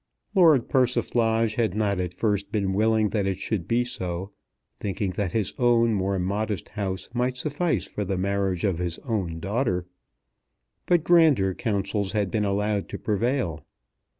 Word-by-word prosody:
Lord 165 Hz, -, +5 dB
Persiflage 115 Hz, -3 st, +2 dB
had 110 Hz, -5 st, +1 dB
not 100 Hz, -3 st, 0 dB
at 90 Hz, -1 st, -3 dB
first 100 Hz, 0 st, -1 dB
been 100 Hz, -3 st, 0 dB
willing 110 Hz, +1 st, +2 dB
that 100 Hz, -2 st, 0 dB
it 95 Hz, -2 st, -1 dB
should 95 Hz, -4 st, -3 dB
be 120 Hz, +1 st, +2 dB
so, 95 Hz, -5 st, -4 dB, 0.4 s
thinking 100 Hz, -1 st, -3 dB
that 95 Hz, -1 st, -2 dB
his 110 Hz, -4 st, 0 dB
own 120 Hz, -2 st, +4 dB
more 100 Hz, -1 st, 0 dB
modest 100 Hz, +2 st, -2 dB
house 95 Hz, -1 st, -4 dB
might 125 Hz, +1 st, 0 dB
suffice 150 Hz, +6 st, -1 dB
for 105 Hz, -, -4 dB
the 95 Hz, -1 st, -2 dB
marriage 95 Hz, -1 st, -1 dB
of 95 Hz, -5 st, 0 dB
his 85 Hz, -2 st, -2 dB
own 95 Hz, -9 st, -2 dB
daughter. 100 Hz, -2 st, -1 dB, 1.0 s
But 175 Hz, -3 st, +3 dB
grander 155 Hz, -, +4 dB
counsels 100 Hz, -1 st, -2 dB
had 105 Hz, -3 st, 0 dB
been 105 Hz, -1 st, 0 dB
allowed 100 Hz, 0 st, 0 dB
to -, -, -5 dB
prevail. 110 Hz, -, -1 dB
105 Hz, 155 wpm, -25 LUFS, 95-115 Hz, 1.0 s, Lord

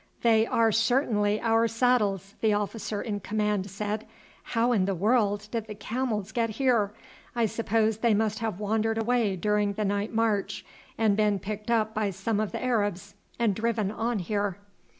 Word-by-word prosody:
"They 225 Hz, -1 st, +4 dB
are 225 Hz, -1 st, +3 dB
certainly 220 Hz, -2 st, +2 dB
our 230 Hz, 0 st, +3 dB
saddles," 215 Hz, -5 st, +1 dB
the 220 Hz, -1 st, +3 dB
officer 210 Hz, 0 st, -2 dB
in 210 Hz, -4 st, -3 dB
command 210 Hz, -1 st, -1 dB
said, 210 Hz, +2 st, -4 dB, 0.3 s
"how 235 Hz, +1 st, 0 dB
in 200 Hz, -6 st, +2 dB
the 195 Hz, 0 st, -1 dB
world 205 Hz, +1 st, +1 dB
did 225 Hz, -2 st, -3 dB
the 210 Hz, -, -7 dB
camels 220 Hz, -2 st, -3 dB
get 230 Hz, 0 st, 0 dB
here? 225 Hz, -3 st, +1 dB, 0.4 s
I 235 Hz, -1 st, +2 dB
suppose 220 Hz, 0 st, 0 dB
they 230 Hz, -2 st, +3 dB
must 220 Hz, +1 st, 0 dB
have 220 Hz, -5 st, -3 dB
wandered 220 Hz, +1 st, 0 dB
away 225 Hz, -3 st, +1 dB
during 210 Hz, +2 st, +1 dB
the 210 Hz, +1 st, -2 dB
night 200 Hz, +1 st, -1 dB
march 220 Hz, -3 st, 0 dB, 0.3 s
and 215 Hz, -3 st, +3 dB
been 210 Hz, -1 st, +2 dB
picked 210 Hz, +3 st, -6 dB
up 220 Hz, -2 st, +2 dB
by 215 Hz, -2 st, 0 dB
some 195 Hz, +3 st, -2 dB
of 215 Hz, -1 st, -1 dB
the -, -, -4 dB
Arabs 205 Hz, -5 st, -1 dB, 0.2 s
and 230 Hz, -4 st, +2 dB
driven 220 Hz, -1 st, -1 dB
on 230 Hz, +2 st, -1 dB
here." 200 Hz, 0 st, -1 dB
215 Hz, 170 wpm, -27 LUFS, 205-225 Hz, 0.4 s, They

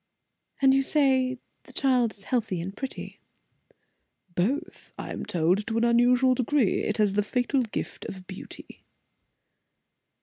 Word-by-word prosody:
"And 265 Hz, 0 st, +7 dB
you 270 Hz, -, +4 dB
say 265 Hz, -3 st, +2 dB, 0.3 s
the -, -, -14 dB
child 250 Hz, -5 st, +2 dB
is 200 Hz, -, -14 dB
healthy 220 Hz, -7 st, -1 dB
and 190 Hz, +4 st, -5 dB
pretty?" 270 Hz, -1 st, -6 dB, 1.1 s
"Both, 270 Hz, -, -2 dB
I -, -, -6 dB
am -, -, -5 dB
told, 180 Hz, +5 st, +1 dB
to 230 Hz, -1 st, -1 dB
an 230 Hz, -, +2 dB
unusual 245 Hz, +2 st, +4 dB
degree. 255 Hz, -2 st, +1 dB
It 210 Hz, -, -1 dB
has 210 Hz, -3 st, +3 dB
the 210 Hz, -, +2 dB
fatal 250 Hz, +5 st, 0 dB
gift 225 Hz, -4 st, -5 dB
of 185 Hz, -1 st, -8 dB
beauty." 190 Hz, +1 st, -11 dB
240 Hz, 140 wpm, -27 LUFS, 205-260 Hz, 1.1 s, And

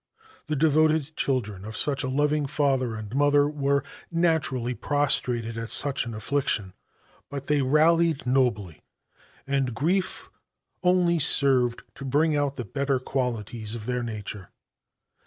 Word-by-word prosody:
The 155 Hz, -, -1 dB
devoted 155 Hz, 0 st, +2 dB
children 105 Hz, -8 st, -2 dB
of 110 Hz, +1 st, -6 dB
such 140 Hz, -2 st, +2 dB
a -, -, -1 dB
loving 145 Hz, +2 st, +1 dB
father 135 Hz, -5 st, 0 dB
and 110 Hz, 0 st, -7 dB
mother 145 Hz, +1 st, +4 dB
were 140 Hz, -1 st, 0 dB, 0.3 s
naturally 160 Hz, -8 st, +1 dB
prostrated 120 Hz, -5 st, 0 dB
at 115 Hz, 0 st, -5 dB
such 140 Hz, -4 st, -1 dB
an 115 Hz, -, -5 dB
affliction. 110 Hz, -5 st, -1 dB, 0.6 s
But 140 Hz, -1 st, -6 dB
they 145 Hz, 0 st, +2 dB
rallied 155 Hz, +3 st, +3 dB
nobly, 120 Hz, -, 0 dB, 0.6 s
and 135 Hz, -4 st, -1 dB
grief 180 Hz, +9 st, -1 dB, 0.5 s
only 180 Hz, -2 st, +3 dB
served 130 Hz, -4 st, +2 dB
to -, -, -10 dB
bring 150 Hz, +4 st, +2 dB
out 145 Hz, -1 st, 0 dB
the 125 Hz, -, -5 dB
better 140 Hz, +4 st, 0 dB
qualities 120 Hz, -4 st, -3 dB
of 110 Hz, -2 st, -7 dB
their 125 Hz, 0 st, -1 dB
nature. 105 Hz, -4 st, -6 dB
135 Hz, 135 wpm, -26 LUFS, 120-150 Hz, 0.6 s, mother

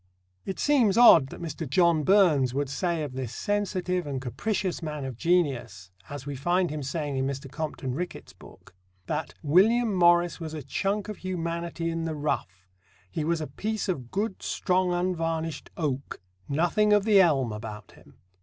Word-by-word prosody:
It 190 Hz, -, -4 dB
seems 245 Hz, -9 st, +3 dB
odd 235 Hz, -, +8 dB
that -, -, -10 dB
Mr. 160 Hz, -2 st, -5 dB
John 170 Hz, +1 st, +3 dB
Burns 155 Hz, -8 st, +4 dB
could 140 Hz, 0 st, -1 dB
say 170 Hz, +1 st, -1 dB
of 145 Hz, -3 st, -5 dB
this 130 Hz, -3 st, -5 dB
sensitive 185 Hz, -4 st, -1 dB
and 135 Hz, -2 st, -3 dB
capricious 185 Hz, -, -2 dB
man 150 Hz, -3 st, -4 dB
of 130 Hz, -2 st, -5 dB
genius, 125 Hz, -, 0 dB, 0.2 s
as 145 Hz, -2 st, -7 dB
we 145 Hz, -1 st, -4 dB
find 175 Hz, +5 st, +1 dB
him 155 Hz, -1 st, -4 dB
saying 145 Hz, 0 st, -3 dB
in 130 Hz, 0 st, 0 dB
Mr. 135 Hz, 0 st, -5 dB
Compton 150 Hz, -5 st, -4 dB
Rickett's 175 Hz, +6 st, -6 dB
book, -, -, -16 dB, 0.3 s
that 150 Hz, +4 st, -3 dB
"William 210 Hz, +9 st, +4 dB
Morris 175 Hz, -2 st, +4 dB
was 160 Hz, -2 st, -6 dB
a 150 Hz, -, -6 dB
chunk 200 Hz, +7 st, -2 dB
of 210 Hz, -, -6 dB
humanity 170 Hz, -2 st, -3 dB
in 165 Hz, 0 st, -3 dB
the 160 Hz, -1 st, -3 dB
rough; 95 Hz, -11 st, -3 dB, 0.4 s
he 160 Hz, -, -2 dB
was 165 Hz, +1 st, 0 dB
a -, -, -2 dB
piece 210 Hz, +10 st, -3 dB
of 135 Hz, -10 st, -3 dB
good, 200 Hz, -, -2 dB
strong, 185 Hz, -1 st, 0 dB
unvarnished 165 Hz, -3 st, -2 dB
oak 140 Hz, -4 st, -3 dB, 0.3 s
nothing 175 Hz, +8 st, +2 dB
of 205 Hz, -1 st, +4 dB
the 205 Hz, -3 st, +6 dB
elm 135 Hz, -9 st, +2 dB
about 105 Hz, -1 st, -8 dB
him." -, -, -19 dB
165 Hz, 175 wpm, -27 LUFS, 140-185 Hz, 0.4 s, odd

